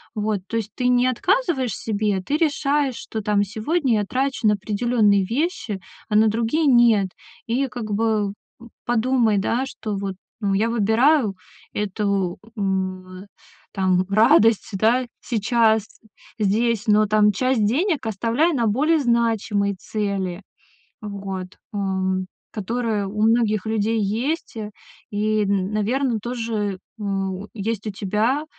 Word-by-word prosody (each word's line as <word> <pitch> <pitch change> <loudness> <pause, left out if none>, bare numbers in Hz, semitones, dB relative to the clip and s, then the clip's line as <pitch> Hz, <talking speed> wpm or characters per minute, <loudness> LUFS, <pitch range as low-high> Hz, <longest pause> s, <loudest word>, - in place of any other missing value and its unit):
Вот, 210 -1 -1
то - - -5
есть 215 -2 -3
ты 250 - 0
не 250 0 +4
отказываешь 265 - +1
себе, 205 0 -1
ты 285 +11 -1
решаешь, 290 -4 +1
что, 220 - -5
там, 205 -1 +2
сегодня 240 - 0
я 205 - -1
трачу 260 0 0
на 210 - +5
определённые 210 -1 +2
вещи, 235 - -2 0.3
а 210 - -1
на 220 +1 +6
другие 230 +8 +1
нет. 235 -6 +5 0.4
И 255 +4 0
как 235 -4 -6
бы, 210 -1 +1 0.3
э, - - -11 0.2
подумай, 240 -2 +2
да, 235 +6 0
что 215 -6 -5
вот, 195 -1 -4 0.3
ну, 200 -2 +1
я 215 +4 +2
выбираю 230 +2 +3 0.4
эту, 200 -3 -1 0.2
м, 185 -2 -3
э, - - -15 0.5
там, 185 -1 +2
радость, 220 +1 +4
да, 230 +6 +2 0.2
сейчас, 220 -1 +2 0.5
здесь, 220 +2 +1
но 215 0 +4
там 210 0 +4
часть 255 +1 +1
денег 295 - +1
оставляй 230 - +1
на 235 -5 +1
более 300 +9 +2
значимые 225 -5 +1
цели, 195 -2 -3 0.6
вот, 195 -3 -5 0.3
ам, 190 -2 -1 0.3
которые 220 0 -2
у 210 +2 -3
многих 220 -3 +2
людей 220 +1 0
есть 235 +10 -2 0.5
и, 215 0 +1
наверное, 215 +6 0
тоже 225 -5 -2 0.2
у 195 -1 -3
есть 220 0 -3
у - - -1
тебя, 215 +9 0
215 Hz, 130 wpm, -22 LUFS, 200-240 Hz, 0.6 s, на